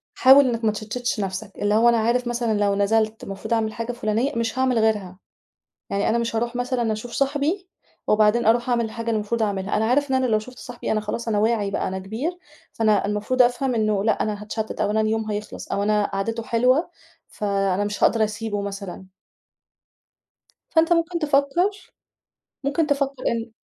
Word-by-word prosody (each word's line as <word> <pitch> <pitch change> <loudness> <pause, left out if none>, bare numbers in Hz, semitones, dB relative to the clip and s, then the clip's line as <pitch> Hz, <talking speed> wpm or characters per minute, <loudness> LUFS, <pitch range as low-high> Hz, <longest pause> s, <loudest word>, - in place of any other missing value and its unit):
حاول 270 +2 +7
إنّك 230 -2 -2
ما 215 - +3
تشَتتش 220 +2 -3
نَفسك، 195 +1 -4
اللي 205 0 +1
هو 230 +2 +5
أنا 235 - +4
عارف 240 +2 +1
مثلًا، 235 -3 0
لو 200 -1 +2
نزلت 215 +2 +1
المفروض 200 +4 -6
أعمل 220 -1 0
حاجة 230 +2 -4
فُلانية، 235 +3 -1
مش 230 +2 -1
هاعمل 255 -3 +2
غيرها. 210 -5 0 0.7
يعني 200 +1 0
أنا 230 - +2
مش 230 -1 -2
هاروح 235 +2 -1
مثلًا 245 -2 -1
أشوف 220 +3 -7
صاحبي 290 +9 -1 0.4
وبعدين 215 +2 +3
أروح 240 +3 +3
أعمل 235 -1 +2
الحاجة 230 +1 -6
اللي 230 - +1
المفروض 220 +2 -1
أعملها، 200 0 -1
أنا 220 - +1
عارف 280 +4 +2
إن 265 - +2
أنا 260 0 +2
لو 220 -3 +2
شُفت 250 +3 -12
صاحبي، 245 -1 -5
أنا 215 -1 +1
خلاص 230 +2 -4
أنا 210 -2 +1
واعي 215 -2 +1
بقى - - -1
أنا 190 0 -3
كبير، 240 - -4 0.4
فأنا 215 -3 +2
المفروض 210 +5 +1
أفهم 245 +1 +2
إنه 215 -3 +1
لأ، 220 0 +1
أنا 210 -1 -3
هاتشتت 215 +1 -4
أو 205 - +1
أنا 220 0 +2
اليوم 215 0 -1
هيخلص 210 +1 -6
أو 200 - 0
أنا 210 0 +2
قعدِته 225 +4 -3
حلوة، 250 +8 +2 0.4
فأنا 200 -1 -1
مش 205 0 -3
هاقدر 225 -2 +4
أسيبه 210 -1 -3
مثلًا. 195 -2 -6 1.7
فأنت 330 +1 +3
مُمكن 340 +1 +1
تفكّر 305 +7 0 0.7
مُمكن 300 +3 +1
تفكّر 275 -2 -1
إن 230 0 -2
225 Hz, 185 wpm, -23 LUFS, 210-250 Hz, 1.7 s, حاول